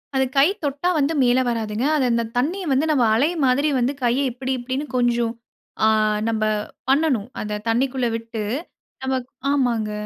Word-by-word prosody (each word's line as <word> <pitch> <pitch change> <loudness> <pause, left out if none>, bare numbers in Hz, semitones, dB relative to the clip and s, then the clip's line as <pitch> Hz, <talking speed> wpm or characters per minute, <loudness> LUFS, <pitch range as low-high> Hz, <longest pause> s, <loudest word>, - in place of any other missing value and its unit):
அது 265 0 +3
கை 275 +2 +7 0.2
தொட்டா 285 +4 0
வந்து 295 +2 +1
மேல 250 0 +4
வராதுங்க, 225 0 -2
அது 280 -4 +2
இந்த 235 0 +1
தண்ணிய 335 +10 0
வந்து 270 +3 +2
நம்ம 275 -5 +3
அலை 265 +8 +3 0.2
மாதிரி 270 +4 +2
வந்து 250 +3 +1
கைய 240 +2 +2
இப்டி, 260 +2 -4
இப்டின்னு 260 +4 -3
கொஞ்சம் 240 -1 +1 0.5
அ - - +6 0.4
நம்ப 220 -1 -1 0.5
பண்ணனும், 270 -6 +2
அத 210 0 -3
தண்ணிக்குள்ள 255 +2 +1
விட்டு 225 -1 -6 0.6
நம்ம, 265 0 0 0.4
ஆமாங்க. 240 -6 +1
250 Hz, 155 wpm, -22 LUFS, 230-275 Hz, 0.6 s, கை